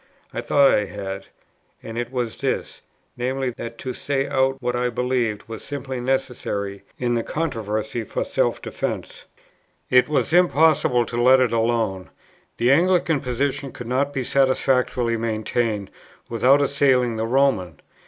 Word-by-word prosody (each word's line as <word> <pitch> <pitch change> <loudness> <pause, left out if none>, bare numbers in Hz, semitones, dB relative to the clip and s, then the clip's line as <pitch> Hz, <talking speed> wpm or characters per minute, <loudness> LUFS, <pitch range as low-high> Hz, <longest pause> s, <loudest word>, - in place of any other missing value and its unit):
I - - -3
thought 140 -1 +4
I 105 - +2
had, 100 -1 -6 0.6
and 115 - -7
it 120 +1 -3
was 125 -3 -3
this, - - -3 0.4
viz. 130 +1 -1
that 115 0 -7
to 130 +1 -5
say 135 +1 -1
out 135 0 +1
what 125 -1 -2
I 125 0 0
believed 120 -3 -1
was 110 -1 -7
simply 135 -2 -5
necessary 120 -6 -2 0.2
in 120 -1 0
the 120 - +1
controversy 110 -6 -3
for - - -3
self - - 0
defence. - - -5 0.6
It 125 +2 +5
was 155 +1 0
impossible 160 -8 +4
to 120 +1 -2
let 130 +2 +6
it 125 -3 +2
alone: 115 -5 0 0.5
the 120 +2 +3
Anglican 170 0 +3
position 135 +1 -2
could 125 - -9
not 135 +3 0
be 130 -2 -2
satisfactorily 125 -3 +1
maintained, 110 -2 -1 0.4
without 125 +5 +4
assailing 130 -4 +2
the 110 +1 -1
Roman. 115 - +1
125 Hz, 145 wpm, -23 LUFS, 115-135 Hz, 0.6 s, let